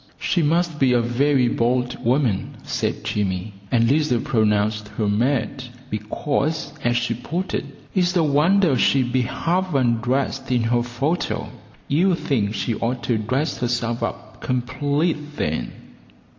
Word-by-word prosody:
"She 175 Hz, -, 0 dB
must 165 Hz, 0 st, +1 dB
be 130 Hz, -2 st, +4 dB
a 120 Hz, -, +4 dB
very 125 Hz, +2 st, +2 dB
bold 125 Hz, +1 st, 0 dB
woman," 120 Hz, -5 st, +1 dB
said -, -, -2 dB
Jimmy; 100 Hz, 0 st, -2 dB, 0.2 s
and 115 Hz, -2 st, +3 dB
Lizer 145 Hz, -5 st, +2 dB
pronounced 105 Hz, -5 st, +1 dB
her 110 Hz, -, +1 dB
mad 125 Hz, +4 st, 0 dB, 0.3 s
because, 140 Hz, +9 st, -2 dB
as 120 Hz, 0 st, +2 dB
she 120 Hz, -1 st, 0 dB
put 170 Hz, +10 st, -4 dB
it, -, -, -1 dB, 0.3 s
"It's 180 Hz, -1 st, +2 dB
a 170 Hz, -, +4 dB
wonder 155 Hz, +3 st, +3 dB
she'd 130 Hz, 0 st, +2 dB
be 130 Hz, -, +3 dB
half 175 Hz, +7 st, -1 dB
undressed 125 Hz, +1 st, 0 dB
in 120 Hz, -2 st, +2 dB
her 120 Hz, +1 st, +2 dB
photo; 135 Hz, +8 st, -2 dB, 0.4 s
you'd 175 Hz, +6 st, +3 dB
think 110 Hz, -10 st, -1 dB
she 120 Hz, -, -1 dB
oughter 120 Hz, +2 st, -1 dB
dress 130 Hz, +8 st, -1 dB
herself 120 Hz, -1 st, -1 dB
up -, -, -5 dB
complete 145 Hz, +4 st, -1 dB
then." 60 Hz, -, -2 dB
125 Hz, 140 wpm, -22 LUFS, 115-150 Hz, 0.4 s, be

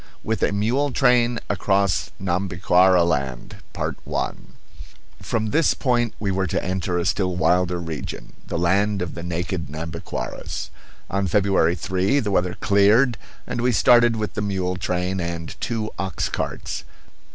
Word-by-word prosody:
WITH 110 Hz, 0 st, -1 dB
A -, -, +2 dB
MULE 120 Hz, +8 st, +1 dB
TRAIN 120 Hz, -2 st, +3 dB
ACROSS 100 Hz, -1 st, +1 dB
NHAMBIQUARA 90 Hz, -1 st, +3 dB
LAND 70 Hz, -7 st, -2 dB, 1.6 s
From 110 Hz, -1 st, -1 dB
this 160 Hz, 0 st, +3 dB
point 120 Hz, -4 st, +1 dB
we 100 Hz, -2 st, -1 dB
were 95 Hz, 0 st, 0 dB
to -, -, -1 dB
enter 90 Hz, -1 st, -1 dB
a 85 Hz, -, -1 dB
still 90 Hz, -3 st, 0 dB
wilder 90 Hz, 0 st, +2 dB
region, 80 Hz, -3 st, -6 dB
the -, -, -3 dB
land 100 Hz, +3 st, +2 dB
of 85 Hz, -, -5 dB
the 85 Hz, -, -6 dB
naked 85 Hz, 0 st, -3 dB
Nhambiquaras. 75 Hz, -5 st, -5 dB, 0.4 s
On 100 Hz, 0 st, 0 dB
February 95 Hz, -3 st, +3 dB
3 95 Hz, -, +1 dB
the 105 Hz, -6 st, -2 dB
weather 90 Hz, -1 st, +1 dB
cleared 105 Hz, +5 st, +4 dB, 0.3 s
and 120 Hz, -, -3 dB
we 125 Hz, +1 st, +3 dB
started 120 Hz, +2 st, +5 dB
with 110 Hz, -1 st, -3 dB
the -, -, -2 dB
mule 95 Hz, -3 st, -1 dB
train 90 Hz, +1 st, -1 dB
and 85 Hz, -2 st, -4 dB
two 110 Hz, -2 st, -2 dB
ox 95 Hz, -3 st, -2 dB
carts. -, -, -4 dB
95 Hz, 140 wpm, -23 LUFS, 90-105 Hz, 1.6 s, started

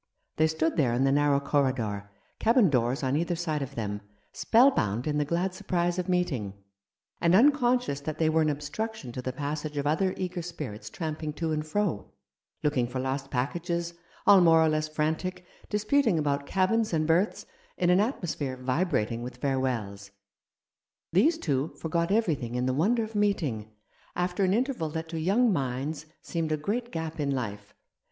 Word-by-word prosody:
They 155 Hz, -, +4 dB
stood 160 Hz, 0 st, -1 dB
there 130 Hz, -7 st, +2 dB
in 130 Hz, -, +2 dB
the 135 Hz, -, +3 dB
narrow 145 Hz, 0 st, +3 dB
corridor, 130 Hz, -8 st, -1 dB, 0.3 s
cabin 230 Hz, -, +4 dB
doors 125 Hz, +1 st, +1 dB
on 130 Hz, +1 st, +1 dB
either 170 Hz, +3 st, 0 dB
side 160 Hz, -3 st, -2 dB
of 140 Hz, 0 st, -5 dB
them, 105 Hz, -2 st, -3 dB, 0.3 s
spellbound 130 Hz, -, +3 dB
in 150 Hz, -1 st, 0 dB
the 150 Hz, -, +1 dB
glad 175 Hz, +5 st, -1 dB
surprise 175 Hz, -1 st, -1 dB
of 180 Hz, +1 st, -3 dB
meeting, 135 Hz, -, -1 dB, 0.7 s
and 170 Hz, +1 st, +4 dB
unconscious 250 Hz, -, +3 dB
that 155 Hz, +1 st, -4 dB
they 160 Hz, -, +2 dB
were 160 Hz, +1 st, +3 dB
an 155 Hz, -, +2 dB
obstruction 150 Hz, -, -4 dB
to 125 Hz, -, -5 dB
the 130 Hz, -, -3 dB
passage 145 Hz, +2 st, -4 dB
of 140 Hz, -, -1 dB
other 185 Hz, +6 st, +1 dB
eager 180 Hz, -1 st, -3 dB
spirits 135 Hz, -12 st, -7 dB
tramping 155 Hz, +1 st, -4 dB
to 160 Hz, +1 st, -2 dB
and 155 Hz, 0 st, -2 dB
fro, 185 Hz, -, -1 dB, 0.5 s
looking 135 Hz, -5 st, +1 dB
for 125 Hz, +2 st, -4 dB
lost 135 Hz, +1 st, -3 dB
packages, 170 Hz, +6 st, -2 dB, 0.3 s
all 200 Hz, -2 st, +8 dB
more 165 Hz, -2 st, +6 dB
or -, -, +3 dB
less 155 Hz, 0 st, 0 dB
frantic, 160 Hz, +4 st, -2 dB, 0.2 s
disputing 215 Hz, 0 st, +2 dB
about 140 Hz, -2 st, -1 dB
cabins 215 Hz, +2 st, +1 dB
and 155 Hz, -1 st, +1 dB
berths, 170 Hz, +6 st, +1 dB, 0.3 s
in 175 Hz, 0 st, +3 dB
an 180 Hz, -, +5 dB
atmosphere 160 Hz, -, -2 dB
vibrat 130 Hz, -, 0 dB
ing 115 Hz, 0 st, -4 dB
with 125 Hz, 0 st, -7 dB
farewells. 120 Hz, -8 st, -2 dB, 1.0 s
These 305 Hz, -, +4 dB
two 145 Hz, -, -1 dB
forgot 170 Hz, +1 st, -1 dB
everything 155 Hz, -, 0 dB
in 125 Hz, 0 st, 0 dB
the 130 Hz, -, +1 dB
wonder 220 Hz, -, +2 dB
of 220 Hz, 0 st, -7 dB
meeting, 155 Hz, -, 0 dB, 0.5 s
after 180 Hz, +2 st, 0 dB
an 190 Hz, +1 st, +3 dB
interval 245 Hz, -, -1 dB
that 160 Hz, +1 st, -5 dB
to 165 Hz, -1 st, -4 dB
young 205 Hz, +7 st, +3 dB
minds 140 Hz, +2 st, -3 dB, 0.2 s
seemed 165 Hz, -2 st, -2 dB
a 155 Hz, -, +1 dB
great 230 Hz, +10 st, -3 dB
gap 160 Hz, -1 st, -4 dB
in 145 Hz, -1 st, 0 dB
life. 105 Hz, -6 st, -4 dB
155 Hz, 175 wpm, -28 LUFS, 135-180 Hz, 1.0 s, all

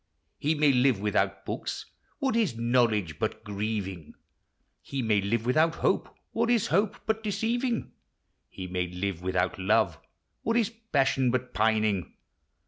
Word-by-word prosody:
He 155 Hz, +2 st, +1 dB
may 150 Hz, -1 st, +4 dB
live 125 Hz, -4 st, +3 dB
without 95 Hz, -1 st, 0 dB
hooks, -, -, -4 dB, 0.2 s
— -, -, -39 dB
what 265 Hz, -4 st, 0 dB
is 205 Hz, -, +1 dB
knowledge 115 Hz, -9 st, +1 dB
but 110 Hz, +1 st, -2 dB
grieving? 100 Hz, -5 st, -4 dB, 0.7 s
He 135 Hz, -2 st, -3 dB
may 105 Hz, -3 st, +3 dB
live 110 Hz, +3 st, 0 dB
without 155 Hz, +6 st, +3 dB
Iftope, -, -, +1 dB, 0.2 s
— -, -, -50 dB
what 230 Hz, +1 st, 0 dB
is 235 Hz, -3 st, +3 dB
hope 195 Hz, +5 st, +2 dB
but 220 Hz, 0 st, 0 dB
de>. 215 Hz, -, -3 dB
ceiving? 230 Hz, +4 st, -1 dB, 0.6 s
He 95 Hz, -, -7 dB
may 90 Hz, 0 st, -2 dB
live 90 Hz, +1 st, -3 dB
Avithout 90 Hz, +1 st, -1 dB
love, 95 Hz, -3 st, +2 dB, 0.2 s
— -, -, -50 dB
what 230 Hz, +1 st, +1 dB
is 230 Hz, -2 st, +2 dB
passion 140 Hz, -, +1 dB
but. 125 Hz, 0 st, -1 dB
pining? 110 Hz, -4 st, +1 dB
115 Hz, 160 wpm, -28 LUFS, -, 0.7 s, may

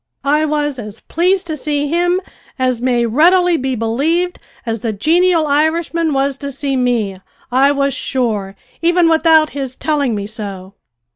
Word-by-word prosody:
I 300 Hz, +2 st, +2 dB
was 295 Hz, -3 st, -1 dB
as 210 Hz, -2 st, -8 dB
pleased 365 Hz, +3 st, 0 dB
to 320 Hz, -2 st, -4 dB
see 290 Hz, 0 st, -1 dB
him, 350 Hz, +4 st, +1 dB, 0.4 s
as 255 Hz, -3 st, 0 dB
may 245 Hz, -2 st, +1 dB
readily 350 Hz, +9 st, +4 dB
be 265 Hz, -3 st, -1 dB
believed, 295 Hz, +11 st, -1 dB, 0.3 s
as 225 Hz, -1 st, -2 dB
the 225 Hz, +1 st, -2 dB
genial 330 Hz, -, +2 dB
Irishman 315 Hz, +2 st, +1 dB
was 275 Hz, 0 st, 0 dB
to 280 Hz, -1 st, -5 dB
see 275 Hz, 0 st, -2 dB
me, 230 Hz, -7 st, -1 dB, 0.3 s
I 270 Hz, +3 st, +4 dB
was 280 Hz, -1 st, 0 dB
sure, 215 Hz, -9 st, -2 dB, 0.3 s
even 345 Hz, 0 st, +3 dB
without 320 Hz, -1 st, +4 dB
his 270 Hz, -2 st, -5 dB
telling 285 Hz, -7 st, 0 dB
me 200 Hz, -1 st, -4 dB
so. 200 Hz, -3 st, -7 dB
280 Hz, 155 wpm, -16 LUFS, 240-320 Hz, 0.4 s, readily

